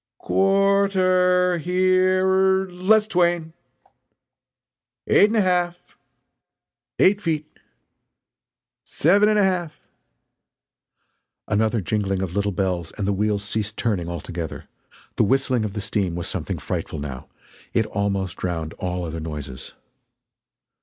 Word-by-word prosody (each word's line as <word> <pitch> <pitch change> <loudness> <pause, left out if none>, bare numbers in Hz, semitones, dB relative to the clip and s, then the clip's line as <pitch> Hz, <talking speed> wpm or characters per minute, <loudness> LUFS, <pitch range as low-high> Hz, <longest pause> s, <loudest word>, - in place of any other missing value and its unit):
"Quar 195 - +2
ter 180 -1 +2
her 185 +2 +2 0.4
er 190 - -10
less 205 +5 +3
twain!" 175 -5 0 1.5
"Eight 205 - +5
and 220 - -2
a 215 - +4
half!" 175 -2 +1 1.2
"Eight 200 +2 +4
feet!" 155 -5 -1 1.4
"Seven 200 +7 +3
ana 210 -1 +3
half!" 175 -5 -1 1.7
Another 110 +1 +1
jingling 95 0 -1
of 90 -2 -4
little 100 +1 0
bells 90 -3 -2
and 100 - -2
the 100 - +1
wheels 105 0 0
ceased 105 0 -3
turning 95 -7 -1
altogether. 85 -1 -6 0.5
The - - +4
whistling 130 0 +1
of 105 -2 -4
the 105 - -4
steam 100 -3 -1
was 85 - -4
something - - -3
frightful - - -4
now 70 -3 -7 0.4
it 110 - +1
almost 100 -3 -2
drowned 80 -3 -3
all 90 -1 -3
other 80 0 -5
noises. 75 -5 -7
110 Hz, 120 wpm, -23 LUFS, -, 1.7 s, Eight